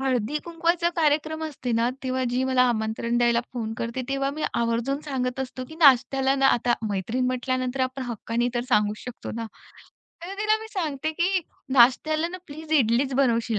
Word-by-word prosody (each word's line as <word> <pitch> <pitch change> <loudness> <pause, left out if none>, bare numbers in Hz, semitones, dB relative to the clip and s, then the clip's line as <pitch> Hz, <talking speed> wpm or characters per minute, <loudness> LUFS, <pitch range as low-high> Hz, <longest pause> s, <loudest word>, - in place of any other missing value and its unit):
हळदी 265 +1 0
कुंकवाचा 340 0 +1
कार्यक्रम 315 0 +1
असते 265 -5 -4
ना, 230 +1 +2
तेव्हा 260 0 -1
जी 250 +1 0
मला 260 -1 +3
आमंत्रण 230 +1 -1
द्यायला 235 -1 +3
फोन 225 -3 -3
करते, 235 +2 -3
तेव्हा 275 0 0
मी 305 +2 -6
आवर्जून 235 +4 0
सांगत 255 -1 -2
असतो, 255 0 -5
की 315 - -10
नाश्त्याला 270 -2 +4
ना 270 0 +4
आता 240 0 +1 0.2
मैत्रीण 225 +7 -1
म्हंटल्यानंतर 255 +1 -1
आपण 260 +1 -1
हक्काने 230 +2 -1
तर 240 - +1
सांगू 210 0 +3
शकतो 250 - -7
ना, 230 -1 -4 0.8
तर 385 +2 -6
तिला 430 +1 +3
मी 445 - -8
सांगते 310 -4 -2
की 365 +3 +1 0.3
नाश्त्याला 310 +6 +4
ना 370 +1 -7
प्लीज 310 +2 -8
इडलीच 260 -1 +3
बनवशील 235 -4 +2
260 Hz, 170 wpm, -25 LUFS, 235-300 Hz, 0.8 s, नाश्त्याला